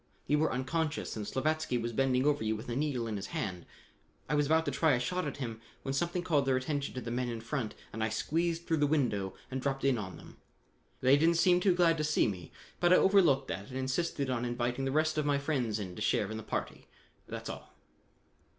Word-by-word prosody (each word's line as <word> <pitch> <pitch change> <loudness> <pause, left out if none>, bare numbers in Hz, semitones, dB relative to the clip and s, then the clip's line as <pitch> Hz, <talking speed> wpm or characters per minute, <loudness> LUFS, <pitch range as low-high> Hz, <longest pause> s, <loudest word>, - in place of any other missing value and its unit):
You 150 +1 +2
were 160 - +2
unconscious 150 +4 -2
and 105 -2 -4
Slavatsky 155 -1 0
was 115 0 -3
bending 130 +1 +2
over 145 -4 +2
you 110 0 0
with 110 +3 -7
a 120 - -2
needle 135 -4 -1
in 110 -2 -3
his 100 - -5
hand. 90 -4 -4 0.6
I 150 - -1
was 145 -1 +2
about 160 +2 +3
to 145 - 0
try 145 +3 +3
a 125 - +2
shot 180 +7 -1
at 145 - -5
him 115 -5 -5 0.2
when 135 - -2
something 175 +5 -1
called 150 -6 +2
their 130 - +3
attention 140 +1 -2
to 130 - -3
the 115 - -5
men 125 +1 -1
in 115 -1 -4
front 115 -1 -3 0.2
and 110 - -2
I 110 - +1
squeezed 165 +9 -1
through 160 - +1
the 145 -1 +3
window 120 -11 0 0.2
and 130 0 -2
dropped 135 0 -2
in 130 -4 +3
on 95 -3 -6
them. - - -14 0.6
They 130 +2 +6
didn't 165 +3 +4
seem 175 +1 +5
any - - -1
too 185 -2 +4
glad 165 -2 +3
to - - +1
see 150 -4 +3
me, 90 -6 -5 0.3
but 175 0 +3
I - - +9
overlooked 175 -10 +4
that 100 +1 -5
and 130 - -5
insisted 135 +2 -1
on 120 -2 -1
inviting 120 +2 -1
the 135 - 0
rest 155 +1 +2
of 150 - 0
my 145 -1 +3
friends 135 -7 -1
in 95 -4 -5
to - - -8
share 105 0 +1
in 110 - -4
the - - -5
party. - - -4 0.4
That's - - -6
all." - - -7
135 Hz, 240 wpm, -31 LUFS, 120-155 Hz, 0.6 s, I